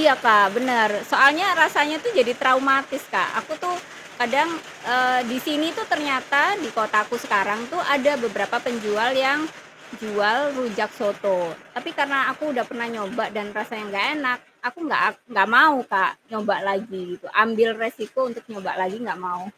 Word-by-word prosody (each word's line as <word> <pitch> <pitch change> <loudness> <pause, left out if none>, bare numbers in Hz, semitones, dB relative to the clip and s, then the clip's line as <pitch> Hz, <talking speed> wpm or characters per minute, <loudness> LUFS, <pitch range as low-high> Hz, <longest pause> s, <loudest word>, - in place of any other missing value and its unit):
Iya 300 -4 +6
Kak, 210 -3 +7
benar. 240 -3 +3 0.2
Soalnya 295 +8 +6 0.2
rasanya 305 -1 +3
tuh 480 - -1
jadi 245 -1 +4
traumatis, 270 +1 +2
Kak, - - +1
aku 315 - -10
tuh 360 0 -2 0.4
kadang, 275 +7 +2 0.4
eee, 255 0 +3
di 255 - -2
sini 305 +1 0
tuh 440 - -4
ternyata, 285 -2 +2 0.2
di - - -5
kotaku 215 +1 +1
sekarang 205 +1 +1
tuh 350 +1 -2
ada 285 +1 +3
beberapa 210 +1 -2
penjual 230 -1 -1 0.2
yang 285 +2 +2 0.6
jual 210 +1 +1 0.2
rujak 225 -4 -3
soto. 200 -3 -1 0.4
Tapi 245 +7 -6
karena 280 -1 +1
aku 265 - -16
udah 240 -4 -1
pernah 235 -2 -5
nyoba 210 +1 -4
dan 210 -1 -4
rasanya 215 0 -6
enggak 200 0 0
enak, 250 -4 -1 0.3
aku 245 - -5
enggak, 300 - 0
ak 215 - -4 0.2
enggak 195 -3 +3
mau, 310 -2 +8 0.2
Kak, 190 -2 +3 0.2
nyoba 215 -2 -1
lagi 195 0 -4 0.2
gitu, - - -15 0.2
ambil 225 +1 +2 0.2
resiko 225 +1 -5
untuk 235 -1 -12
nyoba 195 -4 -6
lagi, 185 +2 -3
enggak 225 -5 -6
mau. 180 +1 -6
235 Hz, 165 wpm, -22 LUFS, 210-275 Hz, 0.6 s, mau